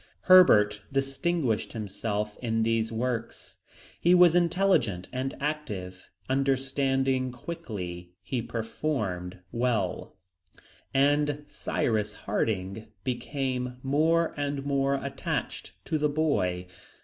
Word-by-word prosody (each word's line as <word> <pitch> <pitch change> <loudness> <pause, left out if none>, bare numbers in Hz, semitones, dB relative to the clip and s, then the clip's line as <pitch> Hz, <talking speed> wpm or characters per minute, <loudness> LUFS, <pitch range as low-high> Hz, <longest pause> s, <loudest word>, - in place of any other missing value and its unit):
Herbert 105 - +6
distinguished 135 -2 0
himself 105 -1 -3
in 115 -2 0
these 115 0 +1
works. 115 0 -4 0.4
He 175 +1 +5
was 175 -2 +7
intelligent 175 - +2
and 130 +2 -2
active; 105 -12 -4 0.2
understanding 135 -1 +1
quickly, 90 - -6
he 125 -3 -2
performed 110 -6 -3
well; 120 -4 -1 0.7
and 145 +1 +2
Cyrus 105 -6 -1
Harding 105 0 -2 0.2
became 125 0 -2
more 160 +4 +2
and 145 -1 -2
more 140 -1 +1
attached 135 0 -4
to 155 - -1
the 150 0 +2
boy. 115 - 0
130 Hz, 95 wpm, -28 LUFS, 110-145 Hz, 0.7 s, was